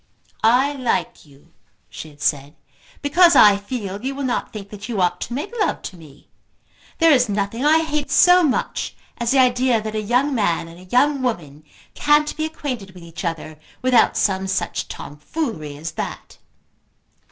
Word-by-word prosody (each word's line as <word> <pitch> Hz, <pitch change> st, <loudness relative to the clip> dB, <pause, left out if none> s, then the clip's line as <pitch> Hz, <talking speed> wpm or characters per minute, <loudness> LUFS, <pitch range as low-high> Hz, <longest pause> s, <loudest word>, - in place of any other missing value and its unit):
"I 255 Hz, +6 st, +4 dB
like 240 Hz, -, -2 dB
you," 145 Hz, +4 st, -22 dB, 0.3 s
she 160 Hz, -, -9 dB
had 145 Hz, -1 st, -12 dB
said, 145 Hz, +1 st, -1 dB, 0.5 s
"because 340 Hz, +4 st, +5 dB
I 205 Hz, -1 st, +8 dB
feel 200 Hz, -2 st, -5 dB
that -, -, -17 dB
you 270 Hz, +1 st, -3 dB
will 280 Hz, -, -4 dB
not 250 Hz, -2 st, -2 dB
think 200 Hz, -2 st, -9 dB
that 210 Hz, +2 st, -9 dB
you 220 Hz, -4 st, -2 dB
ought 180 Hz, -1 st, +1 dB
to -, -, -5 dB
make 380 Hz, -, -5 dB
love 420 Hz, -, 0 dB
to -, -, -7 dB
me. 155 Hz, -5 st, -16 dB, 0.7 s
There 330 Hz, 0 st, +5 dB
is 250 Hz, -5 st, +4 dB
nothing 205 Hz, +4 st, -2 dB
I 315 Hz, +2 st, +4 dB
hate 300 Hz, -2 st, -3 dB
so 360 Hz, 0 st, +6 dB
much 300 Hz, -6 st, -1 dB, 0.2 s
as 235 Hz, -1 st, -1 dB
the 275 Hz, -, +3 dB
idea 250 Hz, -2 st, +3 dB
that 215 Hz, 0 st, -5 dB
a 215 Hz, -, -2 dB
young 250 Hz, +7 st, +1 dB
man 175 Hz, -8 st, 0 dB
and 165 Hz, +1 st, -13 dB
a 185 Hz, -, -14 dB
young 280 Hz, +2 st, +3 dB
woman 155 Hz, -, -4 dB, 0.3 s
can't 295 Hz, 0 st, +2 dB
be 310 Hz, -, -2 dB
acquainted 255 Hz, -11 st, -6 dB
with 180 Hz, -, -12 dB
each 165 Hz, -1 st, -9 dB
other 160 Hz, -2 st, -5 dB, 0.2 s
without 255 Hz, -2 st, +3 dB
some 190 Hz, -1 st, 0 dB
such 190 Hz, -, -2 dB
tomfoolery 150 Hz, -, -6 dB
as 160 Hz, +2 st, -6 dB
that." -, -, -7 dB
225 Hz, 180 wpm, -21 LUFS, 175-275 Hz, 0.7 s, I